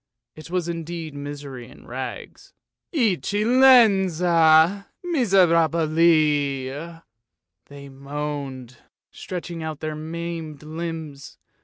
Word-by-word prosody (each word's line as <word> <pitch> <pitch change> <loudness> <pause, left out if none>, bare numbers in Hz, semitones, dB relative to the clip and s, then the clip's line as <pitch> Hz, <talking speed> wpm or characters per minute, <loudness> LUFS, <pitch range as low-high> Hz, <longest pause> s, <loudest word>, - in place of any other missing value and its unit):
It 155 +1 -12
was 180 -1 -2
indeed 165 -2 -5
misery 140 -3 -8
in 130 - -16
rags. - - -8 0.2
" - - -65
Eccellenza, 200 - +4 0.2
miserabili," 165 - +2 0.6
they 140 0 -11
moaned, 140 -2 -6 0.3
stretching 175 -2 -7
out 155 -2 -5
their 155 -1 -4
maimed 160 -1 -6
limbs. 160 -3 -7
160 Hz, 85 wpm, -23 LUFS, 145-175 Hz, 0.6 s, Eccellenza